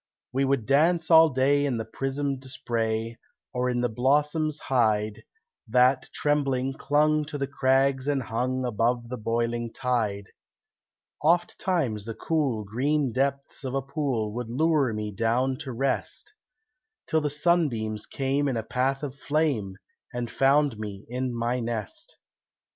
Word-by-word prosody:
We 135 +1 +2
would 135 -5 +1
dance 160 +5 +3
all 160 0 +8
day 140 +1 +2
in 135 -4 0
the 110 - -3
prismed 135 +2 -3
spray, 115 -3 -2 0.3
Or 125 0 0
in 120 -1 0
the 125 - +2
blossoms 150 +6 +1
hide, 110 -6 +1 0.5
That, 125 +3 +3
trembling, 135 -3 0
clung 150 +2 +2
to 150 0 -5
the 140 - -1
crags 135 -1 +2
and 140 -3 +1
hung 125 +3 -1
Above 120 +1 0
the 125 - -4
boiling 115 +1 -1
tide. 110 -6 -1 1.0
Oftimes 165 - +1
the 115 -1 -5
cool, 140 -9 0
green 130 +5 0
depths 140 +1 -2
of 130 0 -3
a 135 - +1
pool 135 -7 -2
Would 120 0 -4
lure 150 0 +2
me 105 -1 -3
down 115 +6 +1
to 140 -3 -6
rest, 135 - -2 0.7
Till 160 - +1
the 150 - 0
sunbeams 145 -9 0
came 140 +1 0
in 130 -4 -1
a 110 - -2
path 135 +5 -1
of 140 -3 -3
flame 135 -12 0 0.3
And 120 -1 -4
found 135 -3 +3
me 105 -2 -6
in 125 +1 -2
my 120 +1 -1
nest. 115 -3 -5
130 Hz, 145 wpm, -26 LUFS, 115-145 Hz, 1.0 s, all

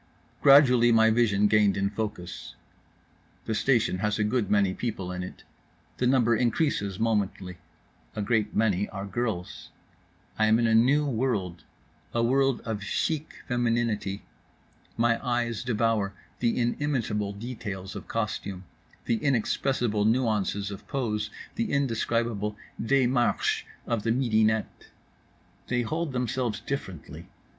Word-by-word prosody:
Gradually 125 -4 +7
my 110 -1 +5
vision 105 -3 +3
gained 105 -1 +4
in 100 0 0
focus. 105 -5 -5 0.9
The 110 - -1
station 110 -4 +2
has 105 +1 0
a 105 - +1
good 105 -1 0
many 100 -2 +3
people 95 -6 -4
in 90 0 -4
it. 90 - -8 0.5
The 125 - +1
number 120 -3 +3
increases 115 - 0
momently. 100 -5 -1 0.6
A 105 - -2
great 110 -1 0
many 105 -3 +1
are 100 -1 -6
girls. 100 -4 -4 0.7
I 110 - +4
am 110 +1 +5
in 120 - +2
a 115 - +3
new 130 +7 +4
world—a 115 - -3
world 135 +1 +2
of 110 -3 -4
chic 155 +8 -2
femininity. 115 -5 0 0.7
My 115 0 +2
eyes 120 -2 -1
devour 110 -4 0 0.2
the 120 -1 +1
inimitable 120 -5 -1
details 100 -4 -6
of - - -8
costume, 105 -4 -3 0.4
the 115 - +1
inexpressible 120 -4 +1
nuances 105 -4 +1
of 100 - -9
pose, 110 -5 -2 0.2
the 230 0 -2
indescribable 115 -5 0 0.2
démarche 125 0 +2 0.2
of 115 -2 -1
the 115 - -2
midinette. 110 -3 +1 0.8
They 125 -1 0
hold 160 +6 -2
themselves 125 -2 -1
differently. 115 - -6
115 Hz, 125 wpm, -27 LUFS, 105-125 Hz, 0.9 s, Gradually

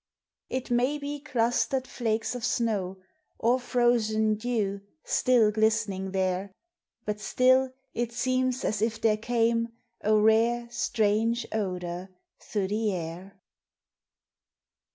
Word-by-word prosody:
It 260 -1 -3
may 250 +5 +2
be 290 0 -5
clustered 255 -1 0
flakes 225 -1 -1
of 245 -2 -6
snow, 210 -6 0 0.4
Or 240 +3 +2
frozen 235 -3 +2
dew 210 -3 -1 0.2
still 240 -4 +3
glistening 215 -3 +1
there, 190 0 -1 0.5
But 210 0 -2
still 255 +4 +3 0.2
it 240 0 -2
seems 255 +1 0
as 210 -1 -1
if 225 0 0
there 220 -1 +3
came 230 0 +1 0.4
A 215 +1 +3
rare, 225 +3 +3
strange 225 +1 +1
odor 180 -3 -3 0.3
through 200 -3 -2
the 215 0 0
air. 180 +2 -6
225 Hz, 110 wpm, -28 LUFS, 205-245 Hz, 0.5 s, still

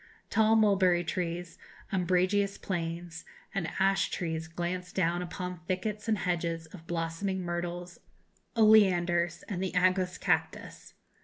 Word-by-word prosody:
Tall 220 0 +4
mulberry 190 -5 +4
trees, 175 0 -3 0.3
umbrageous 185 +2 +1
planes, 170 -2 -4 0.3
and 195 -5 -1
ash 195 0 +2
trees 160 -2 -3
glance 175 +2 -4
down 175 -1 0
upon 180 0 -5
thickets 210 +3 -2
and 220 -1 +2
hedges 170 -3 -1
of 165 0 -13
blossoming 175 +3 -2
myrtles, 175 0 -4 0.6
oleanders, 175 -6 +4
and 185 -3 -3
the 190 - -2
aguus 185 0 +2
cactus. - - -2
180 Hz, 115 wpm, -30 LUFS, 170-190 Hz, 0.6 s, Tall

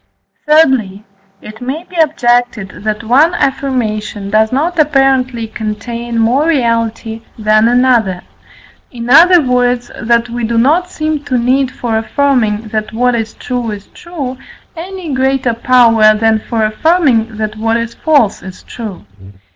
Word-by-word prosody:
Thirdly, 260 -10 +2 0.4
it 215 +2 -11
may 270 +7 -4
be 365 - -16
objected 245 - +1
that 215 +1 -3
one 285 +10 +3
affirmation 215 -8 -2
does 220 +1 +2
not 325 +6 -1
apparently 270 -5 +1
contain 230 +2 -5
more 245 +7 +2
reality 230 -5 -1 0.2
than 215 0 +2
another; 240 -7 +2 0.7
in 240 0 -6
other 345 +5 +7
words, 245 -1 0
that 235 +1 +1
we 240 0 -5
do 230 +1 -1
not 315 +10 +2
seem 310 -3 -3
to 255 - -1
need 255 +2 +1
for 230 -4 -2
affirming, 225 -4 0
that 215 0 -3
what 245 +2 +1
is 225 -2 -3
true 245 -2 -4
is 205 -1 -7
true, 280 -7 -7 0.4
any 350 -2 -6
greater 260 -2 0
power 230 -3 +4
than 220 0 +1
for 220 0 -2
affirming, 230 -3 +1
that 215 -1 -3
what 225 +1 0
is 230 0 -4
false 285 -10 +1
is 185 -1 -11
true. 215 - -8
240 Hz, 140 wpm, -13 LUFS, 220-270 Hz, 0.7 s, other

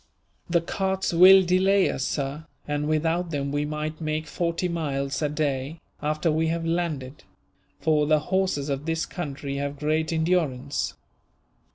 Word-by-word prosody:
"The 170 -1 +3
carts 190 +2 -1
will 190 +3 +8
delay 190 +2 +3
us, 130 - -3
sir, 140 +3 -3 0.2
and 145 0 -1
without 165 +3 0
them 140 -3 -2
we 145 +1 0
might 155 +1 -4
make 155 0 -2
forty 170 +3 -1
miles 140 -5 -2
a 150 - +1
day, 145 0 -2 0.2
after 155 +2 0
we 160 +1 +1
have 165 0 -1
landed; 160 -5 -2 0.6
for 155 -2 +2
the 155 0 +5 0.2
horses 185 -7 +1
of 140 +2 -3
this 165 0 0
country 140 -5 -5
have 140 0 -3
great 155 +2 0
endurance." 160 -5 0
155 Hz, 150 wpm, -25 LUFS, 145-170 Hz, 0.6 s, will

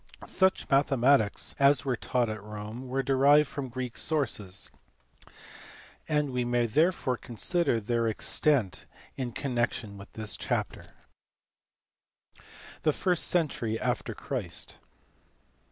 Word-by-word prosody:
Such 190 0 +1
mathematics 135 -5 +3
as 140 +1 +5
were 130 -2 +1
taught 120 +1 0
at 110 -1 -5
Rome 105 +4 -7
were 135 +2 -1
derived 140 +3 +5
from 140 -2 -5
Greek 125 -1 -5
sources, 110 - -2 1.4
and 150 -2 +1
we 125 -1 0
may 120 0 +1
therefore 140 0 +1
conveniently - - -17 0.5
consider - - +1
their 115 +2 0
extent 115 -1 +1 0.3
in 125 -2 -3
connection 120 -5 -2
with 100 - -12
this 110 -1 -2
chapter. - - -3 1.9
The 155 - +2
first 180 0 +1
century 120 -10 0
after - - -2
Christ. - - -4
125 Hz, 115 wpm, -29 LUFS, 115-140 Hz, 1.9 s, as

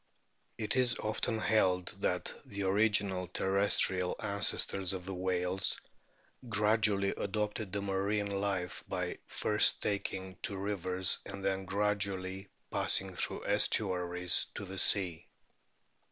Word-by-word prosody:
It 110 +1 -2
is 125 -2 +3
often 110 +1 -1
held 95 -5 +2
that - - -1
the 100 0 -5
original 100 -2 +2
terrestrial 95 -1 +2
ancestors 100 -2 +1
of 90 -2 -6
the 95 - -5
whales 90 +1 -1 0.7
gradually 105 -2 +2
adopted 105 0 -3
the 100 0 -2
marine 100 +1 -1
life 95 -4 -2
by - - -3
first - - +3
taking 95 -2 -3
to 100 - -1
rivers 95 -2 0
and 100 -1 -7
then 95 0 -1
gradually 95 -1 -2 0.2
passing 95 -1 0
through - - -3
estuaries 90 0 +2
to 100 - -5
the 95 0 -5
sea. 90 -4 +2
95 Hz, 115 wpm, -32 LUFS, 95-105 Hz, 0.7 s, is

